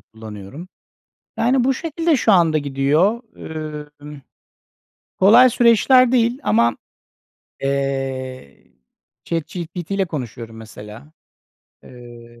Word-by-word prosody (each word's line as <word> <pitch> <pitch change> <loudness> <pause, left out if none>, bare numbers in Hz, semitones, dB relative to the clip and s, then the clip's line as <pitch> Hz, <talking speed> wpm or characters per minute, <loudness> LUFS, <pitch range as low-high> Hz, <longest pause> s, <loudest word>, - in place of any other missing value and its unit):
kullanıyorum. 110 - -11 0.7
Yani 250 +2 +2
bu 265 +2 +2
şekilde 330 +2 -1
şu 220 - +2
anda 165 -4 +4
gidiyor. 150 - 0 0.8
Imm, 150 -1 -11 1.0
kolay 235 +7 +6
süreçler 245 +2 +4
değil 240 +1 +1
ama, 115 +2 +2 0.9
eee, 135 - -4 0.5
ChatGPT 170 +2 -5
ile 195 -1 +1
konuşuyorum 120 -7 -7
mesela. 110 +5 -12 0.7
Eee, 120 -1 -14
150 Hz, 85 wpm, -20 LUFS, -, 1.0 s, kolay